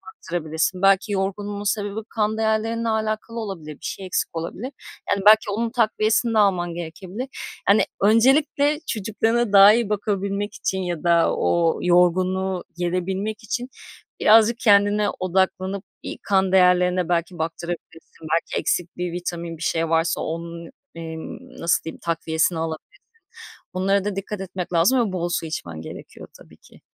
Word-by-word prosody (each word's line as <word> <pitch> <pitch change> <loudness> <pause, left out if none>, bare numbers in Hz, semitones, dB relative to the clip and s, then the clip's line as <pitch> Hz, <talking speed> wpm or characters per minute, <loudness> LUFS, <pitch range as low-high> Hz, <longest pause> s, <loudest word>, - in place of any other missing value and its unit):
baktırabilirsin, 170 - -2
belki 195 +1 +3
yorgunluğun 200 +1 -2
sebebi 205 0 -1
kan 215 0 -1
değerlerinle 225 +1 0
alakalı 220 +1 -2
olabilir. 180 -9 -6
Bir - - -13
şey 195 - -5
eksik 185 - -1
olabilir. 195 +11 -5 0.4
Yani 200 - +1
belki 215 0 +7
onun 230 +3 -1
takviyesini 225 0 +1
de 220 - +3
alman 180 -4 +2
gerekebilir, 185 +8 -6 0.4
hani, 200 +2 +5 0.2
öncelikle 275 +7 +3
çocuklarına 225 +2 0
daha 200 +1 +9
iyi 235 -2 0
bakabilmek 200 0 -2
için 190 - -2
ya 175 -3 -4
da 170 -1 +3
o 170 -1 +1
yorgunluğu 185 +1 +2
gerebilmek 190 +5 -2
için 245 +4 -3 0.5
birazcık 225 +2 +5
kendine 205 -1 +4
odaklanıp 190 +1 0 0.2
bir - - -6
kan 190 -2 +2
değerlerine 180 -1 +3
belki 170 +1 -1
baktırabilirsin. 165 0 -6
Belki 170 - 0
eksik 175 0 -2
bir 180 -1 -3
vitamin, 170 -1 -5
bir - - -16
şey 165 0 0
varsa 165 +1 +1
onun, 170 0 -5 0.3
emm, 165 +10 -8
nasıl 170 +1 +2
diyeyim, 160 - -7
takviyesini 165 0 0
alabilirsin. 160 -1 -6 0.7
Onlara 195 +1 +1
da 205 -1 -3
dikkat 195 +1 -5
etmek 185 -1 -5
lazım 185 +10 +4
ve - - -6
bol 175 -1 -2
su 175 -1 -2
içmen 85 - -6
gerekiyor 80 - -10
tabii - - -17
ki. - - -20
190 Hz, 145 wpm, -23 LUFS, 170-215 Hz, 0.7 s, daha